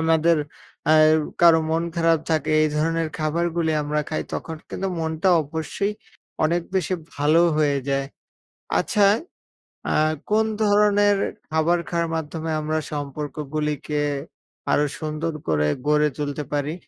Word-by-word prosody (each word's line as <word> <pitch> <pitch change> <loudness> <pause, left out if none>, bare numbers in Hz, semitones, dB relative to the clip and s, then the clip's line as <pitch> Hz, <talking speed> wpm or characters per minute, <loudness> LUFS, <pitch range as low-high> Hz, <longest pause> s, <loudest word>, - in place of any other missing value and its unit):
আমাদের 160 +1 +3 0.5
অ্যা 155 - +5 0.5
কারো 170 -1 +7
মন 165 +1 +1
খারাপ 165 -1 +3
থাকে, 155 -2 +1
এই 155 - +3
ধরনের 165 +1 0
খাবারগুলি 165 +1 0
আমরা 150 +1 -1
খাই, 155 - -2
তখন 160 -1 -5
কিন্তু 195 - -3
মনটা 160 +3 0
অবশ্যই 160 +7 -3 0.5
অনেক 170 +2 +1
বেশি 190 0 +1 0.2
ভালোও 155 +4 +4
হয়ে 145 -2 +2
যায়। 135 0 0 0.7
আচ্ছা, 205 -2 +3 0.8
আ - - +1 0.4
কোন 215 +1 +4 0.2
ধরনের 205 0 +4 0.3
খাবার 160 +2 +2
খাওয়ার 170 -1 -1
মাধ্যমে, 160 +1 -4
আমরা 155 +1 -1
সম্পর্কগুলিকে 150 +1 -3 0.7
আরো 150 - +3 0.2
সুন্দর 155 +1 -3 0.2
করে 75 -1 +2 0.2
গড়ে 150 0 +4
তুলতে 145 0 -3
পারি? 145 +1 -1
160 Hz, 125 wpm, -23 LUFS, 150-170 Hz, 0.8 s, কারো